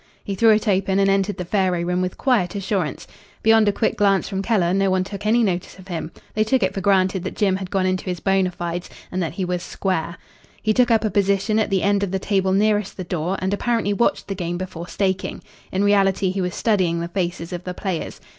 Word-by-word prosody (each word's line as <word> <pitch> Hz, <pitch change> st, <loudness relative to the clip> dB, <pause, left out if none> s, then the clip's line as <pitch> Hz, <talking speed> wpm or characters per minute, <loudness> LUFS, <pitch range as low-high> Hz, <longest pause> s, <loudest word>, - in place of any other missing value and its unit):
He 200 Hz, -, -4 dB
threw 225 Hz, +4 st, +4 dB
it 215 Hz, +1 st, +3 dB
open 195 Hz, -1 st, +2 dB
and 195 Hz, 0 st, +4 dB
entered 195 Hz, 0 st, 0 dB
the 180 Hz, -, -4 dB
faro 185 Hz, -2 st, +1 dB
room 180 Hz, +1 st, 0 dB
with 185 Hz, -1 st, -3 dB
quiet 220 Hz, -9 st, +1 dB
assurance. 190 Hz, -6 st, -2 dB, 0.4 s
Beyond 225 Hz, -1 st, +5 dB
a -, -, +5 dB
quick 220 Hz, -, -1 dB
glance 200 Hz, -2 st, +3 dB
from 195 Hz, -2 st, -2 dB
Keller 195 Hz, -5 st, +1 dB
no 195 Hz, 0 st, +2 dB
one 185 Hz, 0 st, +2 dB
took 200 Hz, +2 st, -6 dB
any 235 Hz, +2 st, +4 dB
notice 180 Hz, -4 st, -2 dB
of 190 Hz, 0 st, -14 dB
him. 165 Hz, -2 st, -4 dB, 0.2 s
They 215 Hz, -, +2 dB
took 235 Hz, +1 st, +1 dB
it 190 Hz, -, +1 dB
for 195 Hz, -, -3 dB
granted 190 Hz, -1 st, +2 dB
that 190 Hz, -, -5 dB
Jim 195 Hz, -3 st, +2 dB
had 190 Hz, -1 st, -6 dB
gone 190 Hz, -1 st, 0 dB
into 185 Hz, 0 st, -1 dB
his 180 Hz, -2 st, -3 dB
bona 195 Hz, -1 st, +2 dB
fides 175 Hz, 0 st, -5 dB, 0.2 s
and 185 Hz, -, -2 dB
that 160 Hz, -4 st, -2 dB
he 185 Hz, +1 st, -2 dB
was 180 Hz, 0 st, -2 dB
"square." 180 Hz, -2 st, -2 dB, 0.4 s
He 215 Hz, -, +1 dB
took 250 Hz, +2 st, +3 dB
up 225 Hz, -2 st, +3 dB
a 215 Hz, -, 0 dB
position 200 Hz, +2 st, +2 dB
at 215 Hz, -, +1 dB
the 195 Hz, -2 st, +1 dB
end 200 Hz, 0 st, +2 dB
of 200 Hz, -, -1 dB
the 190 Hz, -, -1 dB
table 190 Hz, -1 st, 0 dB
nearest 205 Hz, 0 st, +1 dB
the 185 Hz, -, -4 dB
door, 175 Hz, +2 st, -2 dB
and 190 Hz, +1 st, 0 dB
apparently 225 Hz, -1 st, 0 dB
watched 235 Hz, +4 st, 0 dB
the 195 Hz, -, -2 dB
game 175 Hz, -2 st, -3 dB
before 175 Hz, -2 st, -6 dB
staking. 190 Hz, -1 st, -2 dB, 0.3 s
In 190 Hz, +2 st, 0 dB
reality 195 Hz, -2 st, +3 dB
he 190 Hz, 0 st, -2 dB
was 180 Hz, -1 st, -2 dB
studying 185 Hz, -7 st, +1 dB
the 170 Hz, -, -3 dB
faces 175 Hz, -1 st, -3 dB
of 175 Hz, 0 st, -5 dB
the 180 Hz, -1 st, -5 dB
players. 185 Hz, -4 st, -4 dB
190 Hz, 240 wpm, -22 LUFS, 180-205 Hz, 0.4 s, Beyond